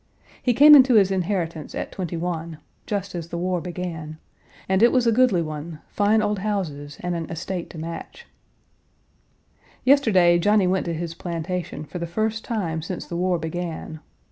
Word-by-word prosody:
He 245 -2 +1
came 300 +4 +9
into 260 -4 +8
his 195 -3 +5
inheritance 175 -4 -2
at - - -4
twenty 175 -3 -4
one 165 -2 -4 0.3
(just 200 -2 -3
as 170 -2 -5
the 170 - -4
war 180 0 -1
began), 170 -3 -6 0.5
and 190 +1 +2
it 235 - +6
was 255 -2 +2
a 230 - +4
goodly 225 -7 +3
one, 155 +1 -6
fine 210 +1 +2
old 210 -1 0
houses 160 -8 -3
and 180 0 -2
an 165 -2 -4
estate 175 +1 -5
to - - -11
match. 170 - -7 1.6
Yesterday, 200 -11 +5
Johnny 205 +2 +3
went 185 0 0
to 170 - -1
his 165 0 -4
plantation 170 -1 -4
for 180 - -7
the 170 - -3
first 220 +5 -2
time 170 -9 -2
since 175 +3 -5
the 170 - -6
war 180 0 +1
began. 160 -1 -5
180 Hz, 170 wpm, -23 LUFS, 165-205 Hz, 1.6 s, came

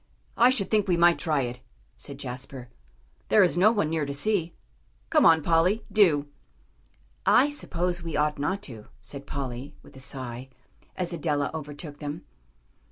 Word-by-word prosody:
"I 240 +2 +6
should 245 -7 0
think 210 -2 +2
we 175 -2 +2
might 170 0 +5
try 155 -4 0
it," 125 0 -5 0.4
said 140 -2 -10
Jasper; 130 -1 -7 0.6
"there 210 - +6
is 180 - +2
no 195 +5 +5
one 205 -9 0
near 160 -2 0
to 140 0 -4
see. 175 0 -1 0.6
Come 305 -2 +6
on, 160 -2 +5
Polly, 175 +7 +2
do." 175 -9 +4 1.0
"I 275 +4 +5
suppose 180 -11 -2
we 165 -2 -4
ought 150 -1 0
not 190 +8 -2
to," 110 - -10
said 140 -1 -10
Polly, 130 -1 -5
with 145 - -17
a - - -11
sigh, 130 -1 -7 0.5
as 180 -1 -2
Adela 150 -3 -1
overtook 150 -1 -8
them. 150 +2 -6
160 Hz, 165 wpm, -26 LUFS, 140-180 Hz, 1.0 s, I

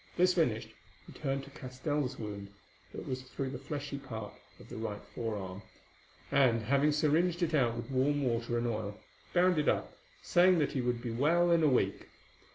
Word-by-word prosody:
This 180 +1 +5
finished, 125 -11 +1 0.4
he - - -12
turned 135 -2 -2
to 140 - -12
Castell's 130 0 -3
wound, 100 -2 -6 0.4
that - - -7
was 130 0 -3
through 130 +1 -5
the 130 - -5
fleshy 140 0 -5
part 110 -6 -7 0.3
of - - -13
the - - -9
right 105 -2 -4
forearm, 100 -4 -4 0.7
and, 130 -5 +4
having 140 +6 +3
syringed 165 +4 +2
it 165 - 0
out 120 -6 +2
with 120 +2 -6
warm 140 +2 +2
water 120 -1 0
and 120 - 0
oil, 105 -3 -3 0.3
bound 180 -2 +4
it 150 - +2
up, - - -1 0.3
saying 180 +1 +5
that 150 -3 +1
he 130 - -1
would 120 -1 -1
be 120 - -3
well 165 +8 +3
in 170 -1 +5
a 155 - +5
week. 120 -8 +1
135 Hz, 185 wpm, -32 LUFS, 115-150 Hz, 0.7 s, This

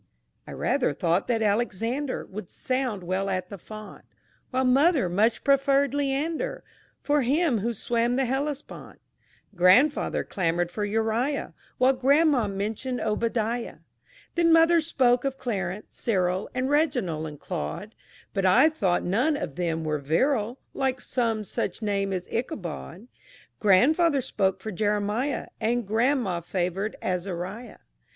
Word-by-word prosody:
_ - - -37 0.4
I - - -8
rather 275 - 0
thought 175 0 +1
that 225 -2 +1
Alexander 235 +5 -1
Would 190 -2 -8
sound 255 -7 -2
well 190 +3 -1
at 185 -1 -2
the 200 - -8
font, 215 +2 -10 0.5
While 260 0 0
mother 275 - +4
much 210 +6 +1
preferred 275 0 +3
Leander 290 - -1 0.4
For 295 0 +2
him 275 -1 +2
who 230 +3 -2
swam 235 +3 0
the 265 0 +1
Hellespont. 280 +3 -4 0.6
Grandfather 190 +12 +4
clamored 175 -1 -1
for 210 - -3
Uriah, 225 +6 -1 0.2
While 255 +1 +4
grandma 275 -1 +3
mentioned 215 +6 -3
Obadiah. 230 +2 -1 0.6
Then 340 -1 +3
mother 330 +1 +6
spoke 250 -6 +2
of 270 -1 -2
Clarence, 200 -6 -4
Cyril, 185 -4 0
And 255 +1 0
Reginald 250 - 0
and 150 -2 -9
Claude, 195 - -5 0.4
But 195 -2 +1
I 190 +12 +6
thought 195 - 0
none 250 - +1
of 140 - -5
them 165 -2 -1
were 155 -1 -1
virile 215 - 0 0.2
Like 265 -1 -1
some 230 -4 -1
such 200 +1 -4
name 200 -1 0
as 185 -1 -3
Ichabod. 205 - -5 0.5
Grandfather 280 - +4
spoke 190 -5 -1
for 220 - -5
Jeremiah. 210 +6 -1
And 235 +1 0
grandma 225 -4 +1
favored 185 +4 -2
Azariah. 185 +5 -4
225 Hz, 135 wpm, -26 LUFS, 190-270 Hz, 0.6 s, mother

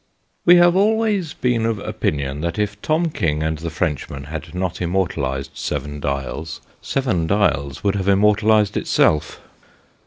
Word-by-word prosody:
WE 175 - +8
have 175 0 +5
always 210 -4 +1
been 120 -3 0
of 115 -1 0
opinion 70 -7 -2
that 85 0 -2
if 105 0 -2
Tom 160 +1 +1
King 75 - -1
and 80 -1 -2
the 85 +1 -4
French 80 -3 -2
man 70 -1 -7
had 80 +4 -7
not 90 -1 -3
immortalised 80 -7 -1
Seven 75 +1 -4
Dials, 70 +3 -4 0.2
Seven 110 -12 -1
Dials 70 -8 0
would 100 -1 +2
have 100 -1 -1
im 100 - +5
mortalised 105 0 +3
itself. 75 - +1
90 Hz, 155 wpm, -20 LUFS, 75-110 Hz, 0.2 s, WE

